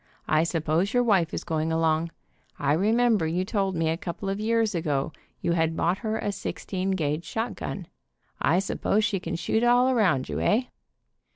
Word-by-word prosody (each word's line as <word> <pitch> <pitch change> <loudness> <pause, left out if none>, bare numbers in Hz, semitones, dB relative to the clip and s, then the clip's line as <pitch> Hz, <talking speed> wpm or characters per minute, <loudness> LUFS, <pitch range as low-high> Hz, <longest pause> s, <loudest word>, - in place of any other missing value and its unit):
I 155 0 +3
suppose 165 +5 0
your 245 - +4
wife 190 -8 +3
is - - -4
going 160 -1 -1
along. 160 0 +1 0.5
I 145 0 +1
remember 215 +1 +3
you 175 +3 -1
told 195 -2 -1
me 165 -1 0
a 160 - 0
couple 190 +1 -5
of 195 +1 -2
years 225 0 +1
ago 150 -4 -1 0.3
you - - 0
had 165 -1 +1
bought 175 +3 +1
her 220 -1 -2
a 205 - -2
sixteen 190 -1 -4
gauge 160 -4 -1
shotgun. 225 -4 -4 0.6
I 165 - +3
suppose 200 +2 +1
she 195 - 0
can 170 -1 -4
shoot 220 +7 0
all 245 +2 +4
around 185 - +2
you, - - -3
eh?" 225 +5 +2
185 Hz, 180 wpm, -26 LUFS, 160-215 Hz, 0.6 s, your